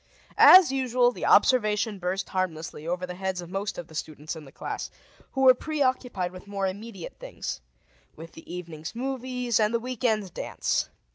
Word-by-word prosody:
_] - - -37 0.3
As 365 -6 +9
usual, 250 -2 +2
the - - -4
observation 215 -4 +3
burst 185 +1 -2
harmlessly 165 -4 -3
over 180 +1 -1
the 180 - -6
heads 190 0 -3
of 175 0 -8
most 195 +1 -3
of 175 - -5
the 160 - -17
students 155 0 -5
in 155 -2 -10
the 135 - -14
class, - - -5 0.4
who 265 - -1
were 260 -1 +8
preoccupied 255 - -1
with 185 +2 -12
more 200 -1 -2
immediate 195 -1 -6
things - - -6 0.5
with 165 +1 -10
the 165 - -13
evening's 165 0 -7
movies 250 -2 -1
and 215 +1 +2
the - - +2
week 250 0 -6
end's 215 -6 +1
dance. - - -2
200 Hz, 185 wpm, -27 LUFS, 180-250 Hz, 0.5 s, As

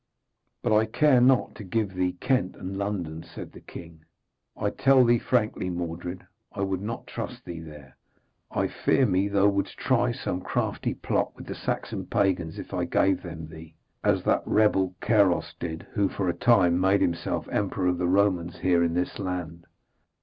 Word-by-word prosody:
'But 115 - +2
I 110 +1 +3
care 130 +2 +4
not 130 0 +4
to 105 - -9
give 100 +2 -1
to 95 - -15
thee 90 -1 +1
Kent 125 -2 0
and 95 +1 -6
London,' 95 -6 -3
said - - -10
the - - -13
king. 80 -2 -11 0.5
'I - - -1
tell 135 -2 +5
thee 120 0 +4
frankly, 110 -7 0
Mordred, 90 +1 -5 0.3
I 100 - -5
would 95 -1 -1
not 115 +3 -5
trust - - -7
thee 85 -2 -6
there. 75 -4 -12 0.5
I - - 0
fear 135 - +2
me 95 -2 +2
thou 100 0 +3
wouldst 100 0 -2
try - - +2
some 90 +8 -3
crafty - - -2
plot - - -1
with - - -10
the - - -5
Saxon - - -4
pagans 90 -4 0
if - - -8
I - - 0
gave 95 0 +2
them 80 -3 -7
thee, 80 0 -12 0.3
as - - +2
that - - +2
rebel 95 -4 +2
Caros 100 -5 +2
did, 80 -1 -5
who 100 -3 +1
for 95 - -2
a 85 - +2
time 90 -7 +4
made 95 +2 +3
himself 85 0 -1
emperor 100 -2 -1
of 90 -1 +1
the 90 - +1
Romans 90 -3 +2
here 90 -2 +2
in 85 0 0
this 90 0 -2
land.' 90 -3 -4
95 Hz, 185 wpm, -26 LUFS, 85-100 Hz, 0.5 s, tell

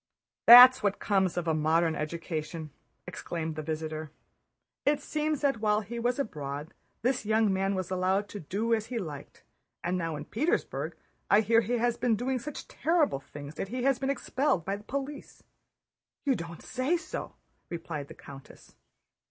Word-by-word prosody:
"That's 250 +2 +11
what 200 -2 +1
comes 190 -4 +1
of 175 -1 -1
a 160 - +2
modern 160 +2 +2
education," 155 0 -4 0.3
exclaimed 160 -2 -5
the 155 - -4
visitor. 155 0 -4 0.7
"It 290 0 +2
seems 305 0 -2
that 275 -5 +1
while 210 0 +2
he 235 +3 -6
was 245 +1 0
abroad 150 - -4 0.3
this 260 +1 +1
young 215 -1 +2
man 195 +1 0
was 185 0 -3
allowed 190 +2 +1
to 205 - -7
do 210 +8 -1
as 220 -1 0
he 250 - -4
liked, 150 -9 -7 0.4
now 170 -3 -1
in 145 0 -6
Petersburg 295 - -1 0.3
I 205 - +6
hear 225 +2 +4
he 230 +3 -3
has 240 0 +1
been 240 -2 +2
doing 255 +4 -1
such 290 +4 -7
terrible 315 - +1
things 145 +1 -10
that 195 - -4
he 245 +4 -4
has 270 -1 +2
been 270 +1 -1
expelled 275 - 0
by 195 - -1
the 205 - -10
police." 280 +4 -6 0.8
"You 275 - +4
don't 170 -6 -6
say 265 +7 0
so!" 325 -2 -7 0.3
replied 165 -4 -5
the - - -11
countess. 135 -1 -13
205 Hz, 170 wpm, -29 LUFS, 165-250 Hz, 0.8 s, That's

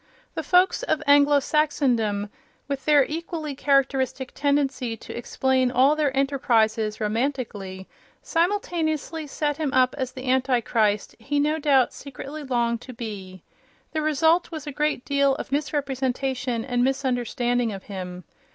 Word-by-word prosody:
The - - -3
folks 365 +5 +3
of 315 -11 -1
Anglo 285 0 +6
Saxondom, 245 -9 0 0.4
with 275 -2 -4
their 290 -3 +5
equally 315 -1 -4
characteristic 265 -2 +1
tendency 280 -5 0
to - - -9
explain 260 +2 +1
all 260 +4 +4
their 290 -3 0
enterprises 225 -6 +1
romantically, 215 -5 -3 0.4
simultaneously 330 -3 -1
set 295 0 -2
him 305 -4 -1
up 255 -1 +4
as 260 -1 -2
the 260 0 -8
Antichrist 240 -5 +1
he 285 +6 -1
no 305 +2 +1
doubt 275 -4 +3
secretly 280 +2 -8
longed 235 -3 0
to 255 - -10
be. 195 -6 -7 0.5
The 310 - -1
result 320 +3 +2
was 315 -3 -7
a 295 - -4
great 300 -2 -1
deal 280 -1 +2
of - - -7
misrepresentation 265 -4 -1
and 245 -2 0
misunderstanding 245 -3 0
of 195 -2 -7
him. 180 -2 -7
265 Hz, 135 wpm, -24 LUFS, 240-290 Hz, 0.5 s, Anglo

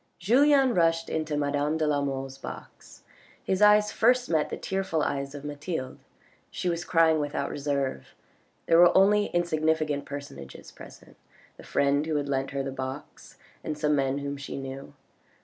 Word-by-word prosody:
Julien 265 - +4
rushed 165 -2 +1
into 155 -1 -2
madame 145 +1 0
de 155 - 0
la 145 -1 +1
Mole's 135 -1 -4
box. - - -11 0.4
His 190 +1 -1
eyes 210 0 +5
first 250 +2 +2
met 155 -2 +1
the - - -5
tearful 190 -5 -2
eyes 140 0 -3
of 145 0 -8
Mathilde; 145 -2 -5 0.5
she 180 - -3
was 170 0 -2
crying 165 -2 +3
without 145 +1 -3
reserve. 140 - -3 0.5
There 165 - +4
were 175 +1 +6
only 205 +2 +4
insignificant 155 -3 0
personages 145 0 -9
present, - - -15 0.4
the - - -12
friend 140 +1 +1
who 160 - -1
had 145 -1 -2
leant 135 -1 -1
her 140 -1 -3
box, 130 +1 -8 0.3
and 150 - -4
some 150 -1 +1
men 135 -1 0
whom 140 0 -4
she 140 - -7
knew. 135 +1 -8
150 Hz, 160 wpm, -27 LUFS, 140-175 Hz, 0.5 s, were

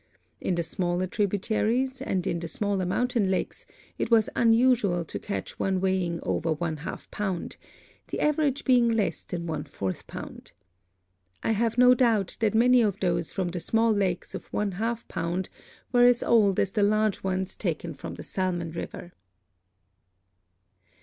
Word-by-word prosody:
In 180 - -1
the 170 - 0
smaller 175 +1 -1
tributaries 220 +7 0
and 190 -9 -1
in 170 - -1
the 170 - -5
smaller 195 +1 -1
mountain 240 0 +1
lakes 190 - -2 0.3
it - - -1
was 225 -2 +4
unusual 225 -7 +3
to - - -6
catch 200 - -5
one 190 -1 +1
weighing 185 -3 0
over 165 -1 0
one 160 0 -3
half 150 - -8
pound, 195 -4 -3 0.5
the - - -4
average 300 -2 +1
being 245 -3 +4
less 225 -3 0
than 170 -2 -5
one 155 -3 -3
fourth 95 -2 -5
pound. - - -9 0.9
I - - +1
have 225 +1 0
no 250 0 +7
doubt 230 -6 +1
that 220 -2 +1
many 245 +2 +5
of 205 -4 0
those 170 -3 0
from 185 -3 -2
the 175 0 -4
small 225 +5 +2
lakes 190 -4 -1
of - - -8
one 205 -1 -1
half 225 +5 -3
pound 175 +3 -3 0.4
were 245 0 +5
as 245 -1 +4
old 205 -5 +4
as 195 - +1
the 210 - 0
large 215 0 +2
ones 190 0 -2
taken 170 -3 -3
from 135 - -8
the - - -8
Salmon 175 -3 -2
river. 175 +1 -7
200 Hz, 165 wpm, -27 LUFS, 175-230 Hz, 0.9 s, no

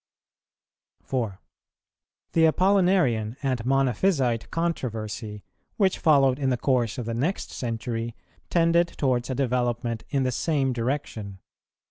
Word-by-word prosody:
The 115 -7 -1 1.1
Apollinarian 175 - +2
and 130 -4 0
Monophysite 130 - +1
controversy, 110 -10 -3 0.3
which 195 -3 +2
followed 135 -4 +4
in 135 -2 +1
the 125 - +1
course 120 -2 0
of 125 - -4
the 115 - -3
next 145 +12 -2
century, 115 -1 -4 0.3
tended 170 0 +3
towards 130 -6 -1
a 130 - -1
development 120 -3 -1
in 140 -2 +1
the 130 - 0
same 135 0 0
direction. 115 -5 -3
125 Hz, 110 wpm, -25 LUFS, 115-145 Hz, 1.1 s, followed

